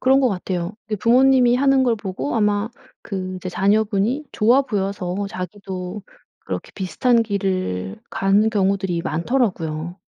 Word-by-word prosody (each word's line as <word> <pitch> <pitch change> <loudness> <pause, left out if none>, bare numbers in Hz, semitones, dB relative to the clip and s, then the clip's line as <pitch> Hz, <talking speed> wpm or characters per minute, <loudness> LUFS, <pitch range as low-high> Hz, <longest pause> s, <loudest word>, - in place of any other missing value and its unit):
그런 265 +1 +4
것 255 - +3
같아요. 180 -1 -3
그 215 - -1
부모님이 250 +2 +4
하는 270 0 +4
걸 240 -3 +2
보고 200 +6 -4
아마 210 0 +1 0.3
그 185 -2 -4
이제 185 0 -6
자녀분이 210 - +1
좋아 240 +5 +4
보여서 195 -6 -2
자기도 185 +1 -6 0.4
그렇게 - - -6
비슷한 230 +5 +2
길을 185 - -2
가는 200 +3 +2
경우들이 190 -4 0
많더라고요. 170 - -1
200 Hz, 310 characters per minute, -21 LUFS, 185-235 Hz, 0.4 s, 그런